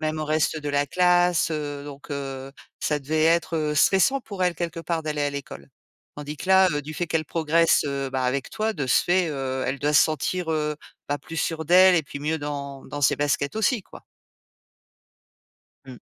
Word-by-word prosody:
même 155 0 -2
au 155 - -2
reste 155 +1 0
de 150 - -5
la 145 0 +1
classe, 180 +1 +3
heu, 145 -2 -4
donc 145 +1 -11
heu, 135 -1 -5 0.3
ça 150 -1 0
devait 155 +3 0
être, 165 0 +2
heu, 150 -1 -1
stressant 195 - +3
pour 200 -4 -5
elle, 180 -1 +2
quelque 170 0 -4
part, 165 -1 -2
d'aller 150 -1 -2
à 145 - 0
l'école 100 - -8 0.5
tandis 150 0 -7
que 185 - -7
là, 190 0 +6
heu, 145 -1 -1
du 155 +2 -8
fait 175 - -2
qu'elle 155 -1 -1
progresse, 165 0 +2
heu, 140 -1 -2
bah, 130 0 -2
avec 130 +1 -1
toi 220 +1 -2
de 145 -7 -3
ce - - +3
fait, 180 -1 +2
heu, 130 -2 -3
elle 135 +1 -2
doit 150 +2 0
se 150 - +7
sentir, 160 +3 -1
heu, 150 -1 -1 0.4
bah, 145 - 0
plus 165 - -9
sûre 160 -1 -2
d'elle 185 +1 +7
et 165 - +2
puis 140 - -8
mieux 155 +2 -1
dans 140 -2 -6
dans 145 0 -6
ses - - +4
baskets 145 +1 -1
aussi, 220 +1 +1
quoi. - - -15 1.8
Mmh. 130 -2 -10
150 Hz, 210 wpm, -24 LUFS, 140-170 Hz, 1.8 s, se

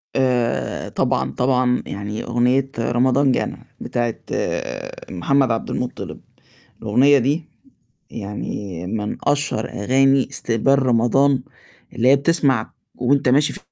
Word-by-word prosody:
آآ 120 - 0
طبعًا، 65 0 0
طبعًا، 125 - +1
يعني 100 +2 -5
أغنية 125 +3 +1
رمضان 130 +4 +2
جانا - - -2
بتاعة 120 -2 -2 1.0
محمد 125 +8 +1
عبد 115 - -2
المُطِّلب، 125 - -5 0.6
الأغنية 130 +7 +4
دي 145 +6 -1 0.6
يعني 100 -4 -6
من 105 +2 -3
أشهر 145 -6 0
أغاني 135 +5 +2
استقبال 135 +4 +1
رمضان 130 +2 +3 0.5
اللي 120 - +1
هي 140 - +7
بتسمع 140 -6 +1 0.2
وأنت 135 +1 +1
ماشي 140 +4 +3
ف - - -6
125 Hz, 110 wpm, -21 LUFS, 115-135 Hz, 1.0 s, هي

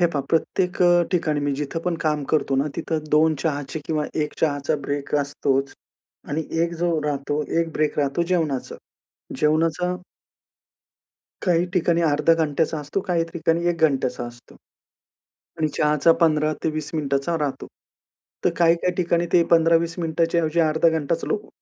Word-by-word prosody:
हे 175 - +5
पहा, 145 - 0
प्रत्येक 180 +3 0
अ, 175 0 +5
ठिकाणी 155 -4 +1
मी 145 0 0
जिथं 155 +3 -3
पण 180 - 0
काम 150 -2 0
करतो 140 -3 +1
ना, 135 - +2
तिथं 155 -2 -2
2 155 +1 +4
चहाचे 145 -1 -2
किंवा 155 -2 -1 0.2
1 150 - -8
चहाचा 145 -1 +1
ब्रेक 145 0 -3
असतोच 140 -1 -1 0.5
आणि 155 +2 -2 0.2
1 170 0 -1
जो 175 - +2
राहतो, 145 +1 -1 0.2
1 165 -1 -3
ब्रेक 150 0 -1
राहतो, 140 +4 +1
जेवणाचा. 155 -7 -1 0.6
जेवणाचा 165 +3 +1 1.5
काही 175 -2 +2
ठिकाणी 170 -1 +2
अर्धा 160 +1 +3
घंट्याचा 160 0 0
असतो, 150 +6 -3
काही 175 -4 0
ठिकाणी 170 0 0
1:00 170 -1 -1
घंट्याचा 130 -3 -2
असतो 120 0 -14 1.1
आणि 155 - +2
चहाचा 150 +2 +4
15-20 155 -1 +1
मिनिटांचा 145 +2 -1
राहतो. 140 -3 -3 0.8
तर - - +6
काही-काही 170 +1 +3
ठिकाणी 170 -1 +1
ते 170 -1 +6
15-20 165 0 +4
मिनिटांच्या 165 +1 +1
ऐवजी 160 +1 0
अर्धा 160 +1 +3
घंटाच 160 0 -1
लोक 210 - -2
160 Hz, 145 wpm, -23 LUFS, 145-170 Hz, 1.5 s, तर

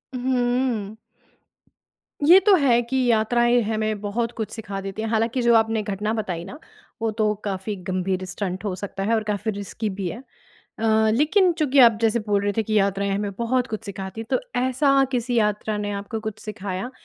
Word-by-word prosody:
हुँ। 245 -4 0 1.3
ये 360 +4 +9
तो 415 - +6
है 250 -7 +3
कि 250 +3 -3
यात्राएँ 240 +2 +3
हमें 215 -1 -1
बहुत 230 +3 -2
कुछ 220 - -3
सिखा 200 -3 -6
देते 195 +2 -5
हैं। 225 - -2
हालाँकि 230 +3 0
जो 235 0 +4
आपने 225 -1 +2
घटना 210 +1 -2
बताई 185 -7 -3
ना, 195 - -9 0.4
वो 225 - +1
तो 215 -1 +1
काफ़ी 200 +1 -3
गंभीर 185 +1 -2
स्टंट 185 0 -4
हो 195 - -1
सकता 195 +1 -5
है 220 +3 +1
और 220 - 0
काफ़ी 210 +2 -1
रिस्की 205 +2 -4
भी 190 -1 -4
है। 195 - -5 0.6
अ, 225 - -3 0.3
लेकिन 355 +6 +3
चूँकि 300 -5 0
आप 230 -4 +7
जैसे 225 +1 +3
बोल 205 -1 +2
रहे 205 - 0
थे, 225 - +2
कि 215 0 +1
यात्राएँ 200 0 0
हमें 200 +1 -1
बहुत 245 +2 0
कुछ 220 -1 -6
सिखाती 195 +1 -6
है। 225 - -5
तो - - +2 0.2
ऐसा 270 +2 +3
किसी 245 0 -1
यात्रा 210 0 0
ने 205 0 -3
आपको 200 +3 -5
कुछ 215 -1 -5
सिखाया, 200 +1 -5
220 Hz, 190 wpm, -23 LUFS, 200-240 Hz, 1.3 s, ये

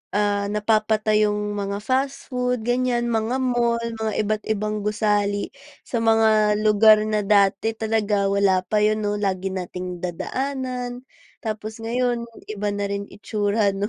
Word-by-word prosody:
ah, 205 -1 +1
napapatayong 210 -1 +1
mga 200 -1 -3
fast 265 +3 -1
food 250 -2 -1
ganiyan, 245 0 +1
mga 225 +3 0
mall, 240 -2 +1 0.2
mga 220 -1 -1
iba't 215 0 -1
ibang 215 0 -1
gusali 205 -1 0 0.3
sa 240 - -3
mga 220 -2 +4
lugar 215 0 +7
na 215 -1 0
dati 200 +2 +2
talaga 215 -2 0
wala 195 -2 +3
pa 210 +3 +1
'yon, 215 0 +2
'no. 205 0 0
Lagi 190 -1 -1
nating 180 -1 -5
nadadaanan 250 +6 -4 0.4
tapos 220 0 -5
ngayon 240 +1 0 0.3
iba 210 -1 -2
na 205 0 -2
rin 200 0 -3
itsura, 205 0 0
'no. 195 +1 -2
215 Hz, 140 wpm, -23 LUFS, 205-230 Hz, 0.4 s, lugar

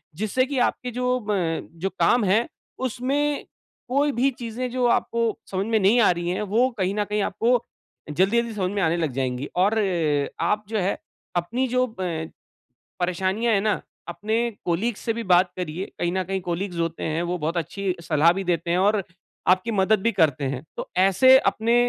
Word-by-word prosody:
जिससे 215 +7 0
की 270 -1 -2
आपके 250 - -7
जो 250 +1 0
अ, 190 -7 -1 0.2
जो 190 +3 -1
काम 240 -2 +4
है 210 +5 +2 0.3
उसमें 275 +4 -1 0.4
कोई 285 +3 +2
भी 265 +2 +2
चीज़ें 240 +1 -4
जो 250 0 0
आपको 230 -2 -1
समझ 190 0 -1
में 225 -1 +2
नहीं 205 +5 +4
आ 210 - +5
रही 175 0 -2
है 185 - -1
वो 250 +3 +4
कहीं 190 +1 0
न 210 - +1
कहीं 210 +1 -1
आपको 235 +4 +2 0.5
जल्दी-जल्दी 225 +8 +1
समझ 185 -2 -1
में 200 0 -1
आने 165 -1 +2
लग 160 -4 -1
जाएँगी। 130 0 -2
और 200 +4 +4 0.7
आप 210 0 +1
जो 220 -1 0
है, 190 +1 0 0.4
अपनी 235 +10 0
जो 255 +1 +2
अ, 180 -8 -4 0.8
परेशानियाँ 190 +6 0
है 200 - +3
ना 215 +1 0 0.3
अपने 215 +6 -1 0.3
कलीग्स 200 +6 0
से 225 - -1
भी 230 +1 -4
बात 180 +1 +5
करिए 180 0 -4
कहीं 175 0 0
न 190 0 0
कहीं 190 +1 -2
कलीग्स 175 +1 -3
होते 165 0 -2
हैं 160 +1 -1
वो 175 +1 -2
बहुत 165 +2 -2
अच्छी 180 +3 -2
सलाह 160 +1 +4
भी 195 +2 -4
देते 170 -1 -1
हैं 175 - +2
और 205 +2 +3 0.5
आपकी 185 +5 +3
मदद 205 +1 +3
भी 230 - +2
करते 155 -7 +2
हैं। 135 -1 -3 0.2
तो - - -4
ऐसे 225 +8 +6
अपने 230 -3 +1
195 Hz, 190 wpm, -24 LUFS, 175-235 Hz, 0.8 s, ऐसे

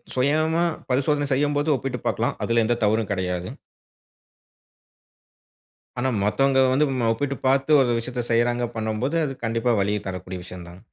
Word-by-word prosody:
சுயமா 155 +5 +2 0.3
பரிசோதனை 145 +3 +1
செய்யும்போது 145 +2 +1
ஒப்பிட்டு 130 -1 -4
பாக்கலாம். - - -1
அதுல 115 0 +2
எந்த 120 +1 +1
தவறும் 110 0 +1
கெடையாது. 90 -2 -2 2.5
ஆனா, 130 +1 +1
மத்தவங்க 135 +5 +2
வந்து 150 +3 +3
நம்ம, 120 -3 0
ஒப்பிட்டு 140 +4 -2
பாத்து 135 +3 +4
ஒரு 125 - +2
விஷயத்த 120 +1 -4
செய்யுறாங்க, 120 +1 +2
பண்ணும்போது, 110 +8 -1
அது 135 -2 -4
கண்டிப்பா 115 +1 +1
வலிய 105 +2 0
தரக்கூடிய 90 -1 -6
விஷயம் 90 -1 -10
தான். 90 +1 -13
120 Hz, 135 wpm, -23 LUFS, 110-140 Hz, 2.5 s, பாத்து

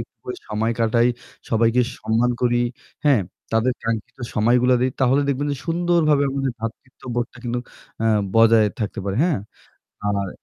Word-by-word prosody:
একটু - - -9
করে 385 -1 -5
সময় 110 +2 0
কাটাই, 115 +1 +3 0.4
সবাইকে 115 +2 +3 0.2
সম্মান 115 +2 +1
করি, 120 0 +3 0.5
হ্যাঁ? 140 -6 +5 0.3
তাদের 115 +3 +2
কাঙ্ক্ষিত 115 +1 -3 0.2
সময়গুলো 125 +4 +4
দেই 130 +1 +2
তাহলে 130 +2 +4
দেখবেন 140 +1 0
যে, - - -3
সুন্দরভাবে 165 -3 +2
আমাদের 135 -1 -1
ভ্রাতৃত্ববোধটা 120 +2 -5
কিন্তু 120 0 -1 0.4
অ্যাঁ 110 -1 +3 0.2
বজায় 115 -1 +6
থাকতে 105 -3 -3
পারে, 100 -1 -2
হ্যাঁ? 175 -6 +1 0.7
আর 100 -1 -1
120 Hz, 145 wpm, -22 LUFS, 115-135 Hz, 0.7 s, বজায়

